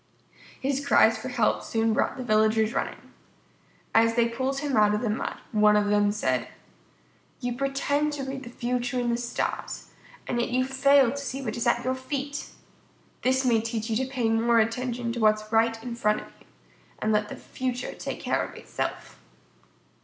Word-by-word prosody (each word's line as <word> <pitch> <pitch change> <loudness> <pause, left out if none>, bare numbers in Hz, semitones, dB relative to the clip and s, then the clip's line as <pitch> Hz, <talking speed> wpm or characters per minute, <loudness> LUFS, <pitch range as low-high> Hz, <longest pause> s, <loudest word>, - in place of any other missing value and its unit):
His 275 +1 -1
cries 225 -5 +5
for 255 - -6
help 240 -4 +1
soon 225 -1 0
brought - - 0
the 255 - -4
villagers 220 0 +2
running. - - -4 0.8
As 230 0 +4
they 235 -1 +3
pulled 260 +4 -2
him 285 -3 -1
out 210 -1 +4
of 210 - -2
the 230 -4 0
mud, 215 - -3
one 210 -1 +5
of 205 -1 +2
them 205 0 +3
said: 210 - 0 0.9
"You 245 -2 -2
pretend 275 +3 0
to 285 -2 -4
read 270 0 -5
the 240 - -9
future 245 +1 -2
in 240 -1 0
the 235 - +1
stars, 240 0 -4 0.3
and 240 - -1
yet - - -1
you 255 +1 +1
fail 270 -1 +4
to 280 - -5
see 275 -1 -4
what 220 -4 -3
is 235 0 -1
at 240 +1 +2
your 260 - +1
feet! 280 +2 -4 0.7
This 260 +1 +2
may 230 -3 +3
teach 225 0 -3
you - - +1
to 260 +1 -1
pay 250 -4 0
more 230 +1 +3
attention 235 +1 0
to 240 - -4
what 215 -1 +5
is 215 0 -11
right 225 0 +2
in 240 -1 -5
front 210 -2 +1
of - - -14
you, - - -23 0.5
and 215 - 0
let 210 0 +1
the - - -6
future 250 -1 -4
take - - -6
care - - 0
of - - -8
itself." - - -5
240 Hz, 195 wpm, -26 LUFS, 225-260 Hz, 0.9 s, cries